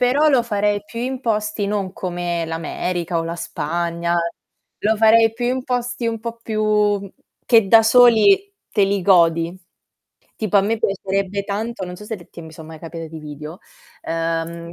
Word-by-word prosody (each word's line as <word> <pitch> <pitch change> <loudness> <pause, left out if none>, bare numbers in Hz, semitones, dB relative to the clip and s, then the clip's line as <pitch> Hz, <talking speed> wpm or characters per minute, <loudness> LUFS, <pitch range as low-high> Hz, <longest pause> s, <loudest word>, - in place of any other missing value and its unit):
Però 270 +5 +3
lo 260 -3 +4
farei 205 -2 0
più 230 - -7
in 255 +1 -3
posti, 215 -3 -1
non 200 -2 -2
come 175 -2 -3
l'America 170 +1 -3
o - - -1
la 165 +1 -4
Spagna, 170 +2 -2 0.6
lo 220 +1 +1
farei 225 +1 +5
più 240 +1 -4
in 255 +1 0
posti 245 -1 -2
un 225 0 -1
po' 230 +1 -6
più 210 -3 0 0.3
che 225 -5 +4
da 225 +2 +7
soli 245 - +5 0.2
te 205 - +3
li 195 0 0
godi. 170 -2 +3 0.8
Tipo 215 -2 0
a 195 - +5
me 220 +3 0
piacerebbe 195 0 -1
tanto, 210 +1 -4
non 180 0 -8
so 210 - -11
se 220 - -4
t 170 -2 -12
son 160 0 -11
mai 160 0 -10
capiti 165 0 -8
dei 160 - -8
video, 150 +2 -9 0.4
ehm, 165 +1 -3
200 Hz, 165 wpm, -20 LUFS, 170-225 Hz, 0.8 s, da